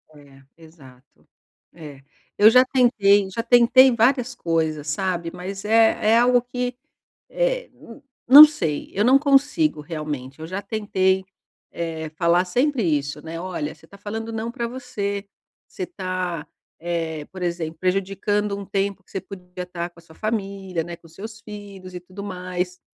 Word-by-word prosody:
É, 140 -2 -17 0.2
exato. 140 -6 -19 0.5
É. 150 -5 -11 0.4
Eu 210 +1 +8
já 255 +3 +6
tentei, 205 -7 +3
já 230 +4 -4
tentei 245 +2 +6
várias 250 +2 +2
coisas, 160 -7 -2
sabe. 170 +1 -2
Mas 190 +2 -7
é 220 0 +3
é - - +6
algo 245 +1 +4
que, 245 0 -4 0.5
eh, - - -1
n 230 - -14 0.3
não 285 +5 +12
sei, 165 - -3
eu 205 - +1
não 255 +4 +6
consigo 285 - +2
realmente, 150 -4 -6
eu 160 - -7
já 185 +3 -4
tentei, 190 -2 0 0.5
eh, 160 -2 -5
falar 175 +1 +3
sempre 250 +6 0
isso, 150 -3 -1
né. 165 +1 -7
Olha, 175 -5 -4
você 160 - -21
tá 200 - -15
falando 220 +3 -6
não 225 +1 -4
pra 235 -1 -3
você, 215 -5 -4 0.4
você 375 - -6
tá, 185 - -4 0.3
eh, 165 -3 -3
por 185 -1 -9
exemplo, 170 -2 -3
prejudicando 195 +2 -1
um 200 - -6
tempo 195 0 -2
que - - -30
você 195 - -3
podia 180 -2 -9
tá 175 -1 -5
com 175 - -20
a - - -19
sua 160 -1 -18
família, 195 -5 -3
né, 170 +1 -7
com 170 0 -19
seus 215 +7 -10
filhos 200 -4 -10
e - - -5
tudo 185 +3 -10
mais. 180 -2 -4
190 Hz, 160 wpm, -22 LUFS, 170-225 Hz, 0.5 s, não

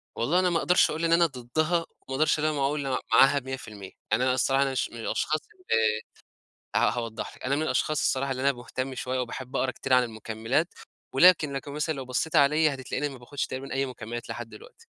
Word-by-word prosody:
والله 150 +10 +2
أنا 185 -1 +3
ما 170 - +1
أقدرش 180 - +4
أقول 160 +2 -2
إن 165 - +1
أنا 170 0 +5
ضدها، 155 +4 -1
وما 165 - -4 0.3
أقدرش 155 +2 +2
إن - - -2
أنا 155 - +2
ما 145 - -3
أقول 140 +1 0
م 130 - 0 0.2
معاها 135 +4 +6
100%، 115 -7 -8 0.2
يعني 110 +4 +3
أنا 130 0 +3
الصراحة 135 +2 +2
أنا 135 - -1
مش 130 - -1
من 120 - -10
الأشخاص 155 +6 -1
اللي 110 -11 +1 0.8
ه - - +6
هاوضح 115 -2 -4
لِك - - -14
أنا 135 +2 +1
من 155 - 0
الأشخاص 155 -1 0
الصراحة 135 +1 0
اللي 130 0 -4
أنا 140 +1 +4
مهتم 130 +1 -5
شوية 130 0 -3
وباحب 125 +1 -5
أقرا 130 - +1
كتير 130 - -4
عن 125 0 +6
المُكملات، 115 - -2 0.4
ولكن 155 0 +5
لكن 140 +1 -5
مثلًا 150 +2 -1
لو 135 -2 -6
بصيتِ 130 +5 -1
عليَّ 150 +3 +5
هتتلاقيني 135 +2 -3
ما 135 -2 -10
باخدش 135 +3 -4
تقريبًا 130 +1 -6
أي 135 +1 0
مُكملات 120 -2 -7
لحد 120 -1 -6
دلوقتي، 105 -1 -15
135 Hz, 220 wpm, -27 LUFS, 120-150 Hz, 0.8 s, معاها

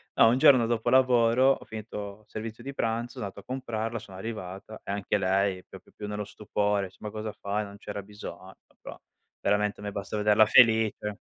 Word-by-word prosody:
no, - - +7
un 120 - +3
giorno 130 -3 +6
dopo 115 -1 0
lavoro 125 0 +5
ho - - -2
finito 105 -2 -7
il - - -42
servizio 110 +1 -7
di 140 +2 -6
pranzo, 115 -1 -2
son - - -6
andato 100 -2 -7
a - - -27
comprarla, 115 -3 -3
sono 100 -4 -12
arrivata 105 0 -7
e - - -5
anche 100 0 0
lei 95 0 +1
proprio - - -14
più 105 - -7
nello 105 0 -3
stupore, 105 -1 -1
dice: 95 0 -14
"Ma 105 - -5
cosa 110 0 -5
fai? 105 +1 -3
Non 100 0 -11
c'era 100 0 -6
bisogno!" 95 -2 -10 0.3
Però - - -9 0.4
veramente, 105 0 +1
a - - -10
me 105 - -4
basta 100 +1 -5
vederla 105 +1 +5
felice. 110 -2 +4
105 Hz, 200 wpm, -28 LUFS, 100-115 Hz, 0.4 s, no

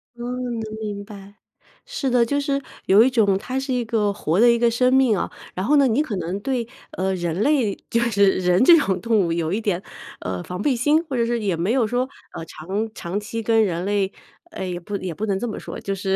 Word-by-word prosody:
嗯， 240 - -8 0.4
能 - - -3 0.2
明 205 -1 -5
白。 200 -1 -12 0.5
是 - - -2
的， 240 -1 +3
就 285 +4 0
是 280 0 -1 0.2
有 200 +3 +6
一 260 - +4
种 205 -6 +3
它 255 +6 -3
是 265 -1 -3
一 245 -2 -1
个 215 -3 +1
活 175 -2 -1
的 240 +1 +7
一 235 - +2
个 235 -1 +4
生 250 +2 +2
命 255 -6 +4
啊。 - - -3 0.2
然 185 +2 -3
后 295 +4 +3
呢， 275 -2 +5
你 245 +6 +2
可 240 -10 -3
能 180 +3 -3
对， 245 -3 -2 0.2
呃， 190 +1 -1
人 175 +1 -2
类， 255 -7 +2
就 230 - +1
是 200 -4 +3
人 180 +4 +2
这 335 +4 +8
种 190 -11 0
动 225 +2 +1
物 165 - -1
有 165 +1 -1
一 225 - -1
点， 195 -4 -1 0.4
呃， 90 -1 -4
防 180 +2 -6
备 270 0 +2
心。 295 +7 +2
或 275 - -4
者 235 -1 +2
是 235 0 -1
也 195 -5 0
没 175 +7 -1
有 250 -3 +2
说， 250 +3 0 0.3
呃， 165 - -6
长 195 +8 -4
长 190 +1 -4
期 225 +2 -5
跟 225 -1 +3
人 175 -2 -1
类 200 -1 0 0.4
哎， 190 - -5
也 175 -1 -4
不 200 +3 -5
也 185 -3 -5
不 215 +7 -3
能 195 -2 -1
这 240 - -3
么 215 - -5
说， - - -7
就 195 0 -3
是 190 0 -1
210 Hz, 265 characters per minute, -22 LUFS, 190-245 Hz, 0.5 s, 这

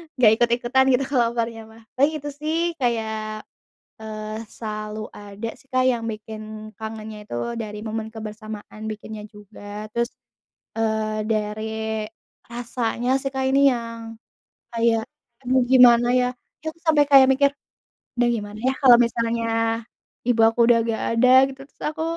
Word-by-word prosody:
enggak 240 -5 +6
ikut-ikutan 240 +3 +2
gitu 250 +2 +2
kalau 250 -4 +3
opornya 230 -1 -2
mah 225 - -16 0.2
paling 280 +4 +4
itu 290 0 -6
sih 310 +1 -1 0.3
kayak, 225 -3 0 0.9
eee, 215 0 -6 0.2
selalu 215 -1 -5 0.2
ada 205 +2 -7
sih - - -24
Kak 255 0 +3
yang 235 -2 -3
bikin 215 0 -8 0.4
kangennya 220 -1 -7
itu - - -4 0.3
dari 210 -1 -6
momen 220 0 -3
kebersamaan 215 -1 -8
bikinnya 215 0 -8
juga 210 -1 -14 0.3
terus, 235 0 0 0.7
eee, 220 -1 0
dari, 215 0 -1 0.9
rasanya 240 0 -2
sih 275 - -2
Kak 265 - -1
ini 270 +1 +3
yang 230 -1 -4 0.7
kayak 230 -1 +2 0.4
aduh 255 0 +2
gimana 240 -2 +7
ya 250 - +2 0.4
kita 315 - -8
itu 335 - -26
sampai 305 -2 +5
kayak 270 -1 +9
mikir, 280 +1 +4 0.7
duh 240 0 +4
gimana 205 -1 -6
ya 265 - +3
kalau 245 -3 +8
misalnya 230 0 -1 0.8
ibu 235 -2 +3
aku 225 - -7
udah 235 0 +5
gak 220 - -3
ada 230 +2 +4 0.2
gitu 270 0 -10
terus - - -30
aku, 315 +1 -4
230 Hz, 145 wpm, -23 LUFS, 215-250 Hz, 0.9 s, kayak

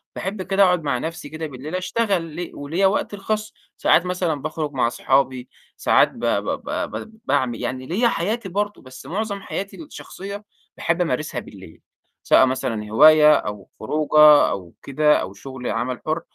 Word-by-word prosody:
باحب 190 +1 -4
كده 195 +1 +2
أقعُد 180 -3 +3
مع 140 -4 0
نَفْسي 160 +1 -6
كده 160 0 -5
بالليل 145 +5 -7
أشتغل 185 -4 -1
ل 175 0 -5
وليّا 165 +7 +1
وقتي 205 +1 -1
الخاص، 215 +2 -3 0.2
ساعات 175 - +3
مثلًا 180 -5 -1
باخرج 155 -1 -3
مع 125 -4 +1
أصحابي، 130 0 0 0.3
ساعات - - +4
ب - - -13
ب - - +1 0.2
ب - - -5 0.2
ب 220 0 -8
باعمل 120 -3 0
يعني 130 0 -4
ليّا 225 +8 +2
حياتي 210 +1 -2
برضه، 205 +2 -2
بس 130 0 -13
معظم 200 +1 -3
حياتي 200 +1 -6
الشخصية، 200 -8 -9 0.3
باحب 170 +1 0
أمارسها 150 -4 -1
بالليل، 95 -7 -13 0.4
سواء 130 - +5
مثلًا 125 -5 -3
هواية 150 +6 +7
أو 105 -7 -3
خروجة 150 +4 +5
أو 90 -3 -6
كده 150 +2 +3
أو 95 +1 -6
شُغل 130 +3 -8
عمل 125 +1 -2
حُر. 160 +2 -1
155 Hz, 165 wpm, -22 LUFS, 130-190 Hz, 0.4 s, هواية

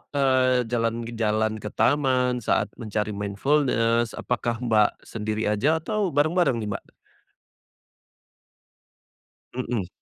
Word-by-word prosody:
eee, 130 -2 +3
jalan-jalan 115 -2 -1
ke 105 - -6
taman 130 -3 +2
saat 110 - 0
mencari 105 -1 -2
mindfulness 115 +2 +1
apakah 120 -1 -2
Mbak 110 -3 +2
sendiri 110 0 -3
aja 135 +10 +2
atau 210 +3 0
bareng-bareng 155 0 +2
nih 105 - -4
Mbak? - - -7 2.6
Hmm. 120 -6 -3
120 Hz, 95 wpm, -25 LUFS, 110-130 Hz, 2.6 s, eee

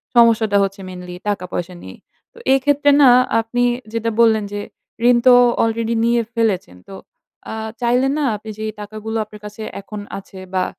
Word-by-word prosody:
সমস্যাটা 225 -3 +4
হচ্ছে 195 +1 -3
মেইনলি 180 -1 -8
টাকা-পয়সা 180 -3 -3
নিয়েই। - - -11 0.3
তো - - -21 0.2
এক্ষেত্রে 285 +2 +3
না 270 - +8 0.3
আপনি 245 +2 -1 0.3
যেটা 230 0 -1
বললেন 220 -2 +4
যে 205 - -3 0.5
ঋণ 245 -1 +6
তো 250 - +9 0.3
অলরেডি 230 0 -1
নিয়ে 235 0 +2
ফেলেছেন। 200 - -1
তো 195 - -8 0.6
আ - - -5 0.3
চাইলে 245 +2 +2
না 305 - 0
আপনি 215 +1 -9
যেই 215 0 -3
টাকাগুলো 215 +2 -5
আপনার 210 0 -14
কাছে 210 +1 -9 0.2
এখন 210 +1 -8 0.2
আছে 195 -1 -11
বা 185 -1 +1
220 Hz, 160 wpm, -19 LUFS, 200-235 Hz, 0.6 s, তো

